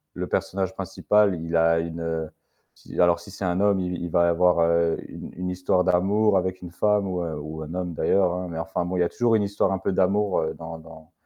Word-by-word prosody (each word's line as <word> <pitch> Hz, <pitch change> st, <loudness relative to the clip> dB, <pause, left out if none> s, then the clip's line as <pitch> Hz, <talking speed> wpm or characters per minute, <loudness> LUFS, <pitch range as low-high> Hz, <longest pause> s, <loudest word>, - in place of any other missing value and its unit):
le -, -, -3 dB
personnage 95 Hz, 0 st, -2 dB
principal 100 Hz, +1 st, +1 dB
il 85 Hz, 0 st, -3 dB
a 85 Hz, 0 st, +4 dB
une, 85 Hz, 0 st, -4 dB
heu, 80 Hz, -1 st, -3 dB, 0.5 s
si -, -, -10 dB
alors 85 Hz, -1 st, +4 dB
si 85 Hz, -, -13 dB
c'est 95 Hz, -, -5 dB
un 90 Hz, +1 st, 0 dB
homme, 100 Hz, -2 st, +3 dB
il 90 Hz, -1 st, -2 dB
v -, -, -3 dB
il 85 Hz, -, -4 dB
va 85 Hz, 0 st, +3 dB
avoir, 90 Hz, 0 st, +3 dB
heu, 85 Hz, 0 st, +2 dB
une -, -, -9 dB
une 90 Hz, +1 st, -4 dB
histoire 90 Hz, 0 st, +1 dB
d'amour 95 Hz, +3 st, +3 dB
avec 95 Hz, 0 st, -2 dB
une 85 Hz, -, -8 dB
femme 105 Hz, +1 st, +1 dB
ou, 90 Hz, -1 st, -2 dB
heu, 80 Hz, -2 st, -4 dB
ou 80 Hz, +1 st, -7 dB
un 80 Hz, +3 st, -8 dB
homme 90 Hz, -2 st, -3 dB
d'ailleurs, 90 Hz, +1 st, +2 dB
hein, 90 Hz, 0 st, -4 dB
mais 80 Hz, -, -5 dB
enfin 90 Hz, 0 st, -2 dB
bon, 90 Hz, +1 st, -2 dB
il -, -, +2 dB
y -, -, +5 dB
a 85 Hz, -, 0 dB
toujours 120 Hz, -2 st, +2 dB
une 105 Hz, -, +2 dB
histoire 100 Hz, -1 st, 0 dB
un 95 Hz, -, -1 dB
peu 95 Hz, -, -1 dB
d'amour, 95 Hz, +1 st, +2 dB
heu, 80 Hz, 0 st, -2 dB
dans 80 Hz, 0 st, -8 dB
dans 80 Hz, -1 st, -14 dB
90 Hz, 255 wpm, -24 LUFS, 85-95 Hz, 0.5 s, y